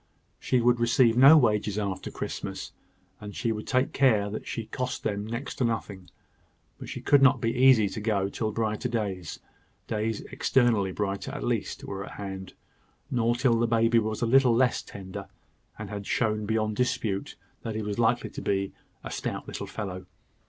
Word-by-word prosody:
She 125 -2 +1
would 120 0 +3
receive 120 0 +4
no 135 +6 +9
wages 105 -5 +2
after 100 -3 -3
Christmas, - - -5 0.5
and 105 -1 -9
she 115 - -1
would 105 -1 -5
take 130 +1 +1
care 110 -7 +3
that 110 - -6
she 115 - -4
cost 125 +3 -4
them 105 -1 -2
next 115 +4 -5
to 135 - 0
nothing; 100 -6 -3 0.7
but - - -8
she - - -6
could 145 -1 +4
not 135 -1 +6
be 115 0 0
easy 125 -4 +5
to 110 - -6
go 100 -3 +1
till 110 +2 -3
brighter 110 +2 -1
days 100 -7 -3 0.5
days 110 0 -2
externally 115 -7 +2
brighter, 100 0 -3
at - - -5
least - - -2
were 95 -1 -5
at - - -9
hand, 95 -2 -7 0.6
nor 120 -1 +2
till 120 -2 +2
the 120 - +2
baby 115 0 +3
was 110 +1 -2
a - - +3
little 125 0 +5
less 125 0 +2
tender, 95 0 -8 0.5
and 110 -2 -7
had 100 -1 -6
shown 110 -3 0
beyond 110 -1 0
dispute 110 -5 -1 0.3
that 110 -2 -5
he 110 - -2
was 105 +1 -3
likely 120 +1 +1
to - - -7
be 100 -1 -1 0.3
a - - -6
stout - - -4
little - - -5
fellow. 95 -3 -6
110 Hz, 180 wpm, -27 LUFS, 100-120 Hz, 0.7 s, no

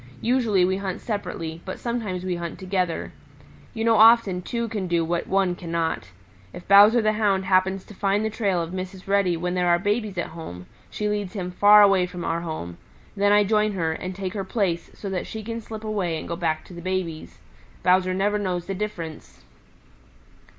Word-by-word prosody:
Usually 225 -6 +2
we 190 +1 0
hunt 195 -2 -4
separately, 165 -7 -5
but 185 - -6
sometimes 220 -7 -3
we 185 - -1
hunt 170 -1 -5
together. 185 -3 -2 0.6
You 225 - -2
know 225 -1 +4
often 220 -4 +6
two 235 +5 -3
can 205 -4 -3
do 170 -1 +1
what 170 +1 -2
one 190 -2 +2
cannot. 170 - -3 0.4
If 175 - -10
Bowser 210 +4 +7
the 215 0 +2
Hound 200 -3 +1
happens 190 0 +2
to - - -12
find 200 +2 0
the 220 - -1
trail 195 -6 0
of 165 - -7
Mrs. 185 0 -6
Reddy 195 -3 +2
when 180 +2 -2
there 180 -1 +1
are 175 0 +5
babies 205 +1 -1
at 175 - -2
home, 90 - -8 0.2
she 210 - -3
leads 205 -3 -2
him 180 -4 -4
far 205 +3 +7
away 195 -3 +4
from 180 -1 -7
our 165 +1 -1
home. 155 - -6 0.4
Then 205 0 +2
I 205 0 +6
join 210 +1 +1
her, 165 -4 -1
and 185 +3 -5
take 190 -1 -4
her 200 -3 -3
place 190 -4 -1
so 205 - -7
that 185 - -3
she 220 -1 -6
can 230 +1 -5
slip 220 0 -8
away 195 -7 -1
and - - -7
go 170 - -3
back 160 -3 -2
to - - -13
the 170 - -8
babies. 180 -3 -4 0.5
Bowser 185 +1 +3
never 205 +2 +1
knows 180 -3 -2
the 195 - -3
difference. 180 -6 -6
190 Hz, 200 wpm, -24 LUFS, 175-210 Hz, 0.6 s, Bowser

